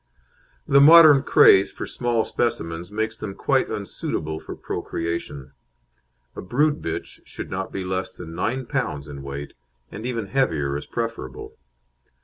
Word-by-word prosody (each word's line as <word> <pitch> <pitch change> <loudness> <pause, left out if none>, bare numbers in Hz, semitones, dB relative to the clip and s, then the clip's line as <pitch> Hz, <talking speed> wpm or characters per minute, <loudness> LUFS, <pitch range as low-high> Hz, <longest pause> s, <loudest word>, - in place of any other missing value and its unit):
The 140 0 +6
modern 155 -2 +9
craze 95 -6 +6
for - - -6
small 120 -2 -1
specimens 85 -7 -2
makes 110 +1 -2
them 100 -3 -6
quite - - +1
unsuitable 80 0 -4
for - - -8
procreation. 85 -5 -5 0.8
A - - -6
brood 145 +10 +1
bitch 80 - -5
should - - -8
not 95 +1 -4
be 95 - -4
less 95 +1 -3
than 80 -2 -10
9 130 +9 -2
lb. 95 - -3
in 70 -1 -8
weight, 70 +1 -7 0.4
and 105 - -8
even 115 -4 -3
heavier 80 - 0
is 75 - -5
preferable. 115 - -5
95 Hz, 140 wpm, -23 LUFS, 80-120 Hz, 0.8 s, modern